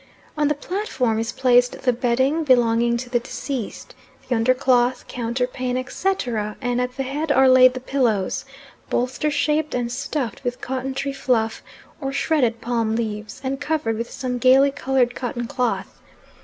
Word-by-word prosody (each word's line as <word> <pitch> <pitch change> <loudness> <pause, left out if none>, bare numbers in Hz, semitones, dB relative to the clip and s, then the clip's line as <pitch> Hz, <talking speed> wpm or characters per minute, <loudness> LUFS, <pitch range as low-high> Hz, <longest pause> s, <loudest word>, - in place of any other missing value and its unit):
On 300 -1 +2
the 295 - +1
platform, 280 - -1
is 225 0 -2
placed 245 -1 +3
the 250 - +3
bedding 260 +6 +1
belonging 235 -3 +3
to 250 +1 -6
the 245 0 +1
deceased, 245 -1 -6 0.3
the - - 0
undercloth, 250 +1 +2
counterpane, 250 +1 -2
etc., 250 - -2
and 245 -1 -1
at 250 0 -3
the 270 - -1
head 290 +4 -2
are 265 -1 +5
laid 255 0 +7
the - - -3
pillows, 245 -7 0 0.5
bolster 255 +5 0
shaped 300 0 0
and 240 -1 -1
stuffed 255 -2 -3
with 245 -1 -3
cotton 265 +1 -4
tree 275 0 -2
fluff, 235 -5 0 0.4
or 270 -1 -2
shredded 265 -5 +1
palm 230 -2 0
leaves, 215 -2 -4
and 270 +1 -3
covered 290 -7 -1
with 230 +2 -4
some 250 -1 -4
gaily 265 +3 +5
coloured 265 -3 +1
cotton 240 -1 -4
cloth. 250 -1 -2
250 Hz, 155 wpm, -22 LUFS, 235-270 Hz, 0.5 s, laid